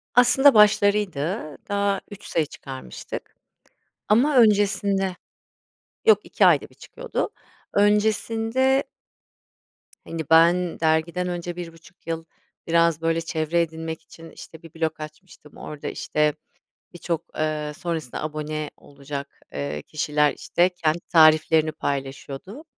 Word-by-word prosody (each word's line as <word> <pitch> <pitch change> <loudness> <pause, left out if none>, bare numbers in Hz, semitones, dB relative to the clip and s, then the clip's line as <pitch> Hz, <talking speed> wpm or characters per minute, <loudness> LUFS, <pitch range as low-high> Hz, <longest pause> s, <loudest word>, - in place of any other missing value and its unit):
Aslında 250 +3 +6
başlarıydı. 205 -6 +2
Daha 200 -1 0
3 205 0 -10
sayı 160 -2 0
çıkarmıştık 135 -3 -9 0.7
ama 260 +7 +3
öncesinde 200 -4 +3 0.9
yok 445 - +6
2 - - +2
ayda - - +4
1 - - -23
çıkıyordu, - - -4 0.4
öncesinde 225 +5 +2 1.2
Hani, 165 -1 -4
ben 170 +2 +4
dergiden 160 +3 +1
önce, 175 -1 -4
bir 175 -1 -5
1,5 165 +2 -18
yıl, 165 0 -3 0.4
biraz, 165 -1 +3
böyle, 165 0 +1
çevre 165 +1 0
edinmek 160 -1 -4
için, 165 0 -14
işte, 160 0 -13
bir 165 - -13
blog 160 -1 -2
açmıştım, 155 0 -12
orada, 150 -1 -7
işte, 150 0 0 0.6
birçok, 170 -2 -3
eee, 155 -1 -2
sonrasında 160 -8 -4
abone 155 0 -4
olacak, 140 0 -9
eee, 75 +1 -4
kişiler, 150 - +1
işte, 175 +1 +1
kendi 170 -2 -1
tariflerini 155 -1 +5
paylaşıyordu. 140 - -5
165 Hz, 115 wpm, -24 LUFS, 155-200 Hz, 1.2 s, Aslında